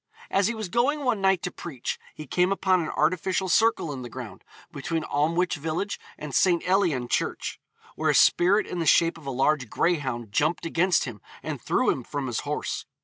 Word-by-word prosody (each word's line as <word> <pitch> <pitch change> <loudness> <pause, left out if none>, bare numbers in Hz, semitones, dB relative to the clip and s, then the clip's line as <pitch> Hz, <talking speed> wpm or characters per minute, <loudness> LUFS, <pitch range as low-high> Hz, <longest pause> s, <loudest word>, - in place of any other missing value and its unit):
' - - -20
As 195 0 +3
he 235 - -2
was 220 -3 -4
going 265 +10 +1
one 235 -5 +1
night 190 -2 +2
to 180 - -2
preach, 140 -9 -5 0.2
he 155 - -8
came 180 +6 +1
upon 190 -2 +2
an 160 - -3
artificial 185 +2 0
circle 220 -6 +2
in 130 - -6
the 120 - -7
ground, - - -9 0.3
between 160 +3 -3
Amlwch 165 +5 0
village 160 +7 -3 0.2
and 150 -2 -7
St. 175 -2 +3
Elian 175 -10 +2
Church, - - -2 0.3
where - - -1
a - - +3
spirit 195 +5 +5
in 180 - -5
the 165 - -1
shape 165 +1 +4
of 145 - -13
a - - -1
large 135 -1 +1
greyhound 130 - -1
jumped 155 +11 +1
against 175 +2 +2
him 115 -6 -7 0.2
and - - -5
threw - - +2
him - - -4
from 145 -2 -4
his 120 -3 -2
horse. 150 -2 -4
170 Hz, 205 wpm, -26 LUFS, 145-190 Hz, 0.3 s, spirit